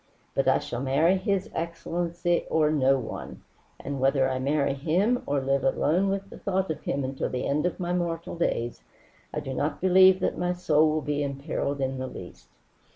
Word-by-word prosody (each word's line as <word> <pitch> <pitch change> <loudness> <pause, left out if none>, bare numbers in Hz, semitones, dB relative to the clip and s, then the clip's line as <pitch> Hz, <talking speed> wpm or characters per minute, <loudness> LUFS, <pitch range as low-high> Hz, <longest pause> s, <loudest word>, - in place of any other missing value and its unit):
But - - 0
I - - +5
shall 120 - -5
marry 145 +7 +3
his 190 0 -1
excellency 170 +1 -2
or 155 -1 +3
no 135 -2 +3
one, 120 -4 -7 0.4
and 140 -1 -5
whether 135 0 +3
I 130 -1 -1
marry 140 +1 +1
him 180 - +1
or 140 0 +1
live 135 +1 0
alone 170 +8 +2
with 195 0 -3
the - - -10
thought 190 -3 -1
of 155 - -5
him 140 - -2
until 135 +1 -3
the 125 - -3
end 150 +4 +1
of 180 - -5
my 175 -1 -1
mortal 170 -2 -2
days, 120 -8 -1 0.5
I - - -3
do 130 - -5
not 145 +4 -2
believe 185 0 +6
that - - -1
my 180 0 0
soul 155 -3 +3
will 155 0 0
be 145 +1 -1
imperilled 140 0 -3
in 135 0 -1
the 130 - -3
least." - - -11
155 Hz, 195 wpm, -27 LUFS, 135-175 Hz, 0.5 s, believe